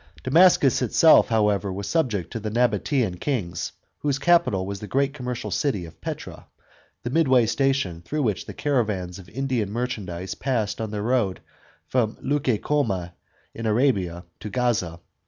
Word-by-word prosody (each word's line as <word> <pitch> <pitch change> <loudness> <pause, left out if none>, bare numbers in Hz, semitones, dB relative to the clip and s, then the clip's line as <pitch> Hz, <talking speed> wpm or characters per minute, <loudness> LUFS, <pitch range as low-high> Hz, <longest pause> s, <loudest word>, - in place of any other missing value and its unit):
Damascus 145 -3 +5
itself, 155 +6 +6
however, 105 -3 +1
was 100 +2 -5
subject 115 - 0
to 115 - -3
the 110 0 -4
Nabatean 115 -3 +1
kings, 90 - -2 0.3
whose 145 -2 0
capital 170 - +3
was 100 0 -5
the 105 - -7
great 140 +3 +1
commercial 125 -4 -5
city 110 - 0
of 80 - -14
Petra, - - -7 0.6
the 120 - -3
midway 130 -6 +4
station 125 -9 0
through 150 - -2
which 105 -6 -1
the - - -6
caravans 105 -10 -1
of 90 -2 -13
Indian 125 -4 -2
merchandise 100 -7 -4
passed 115 -6 -2
on 110 - -3
their 105 -1 -4
road 115 -5 +1 0.5
from 115 -4 0
Leuc^ 130 -6 -1
Come* 100 -12 0 0.4
in 115 0 -4
Arabia, 100 -7 +1
to 105 - -6
Gaza. 105 -9 0
115 Hz, 155 wpm, -24 LUFS, 100-135 Hz, 0.6 s, itself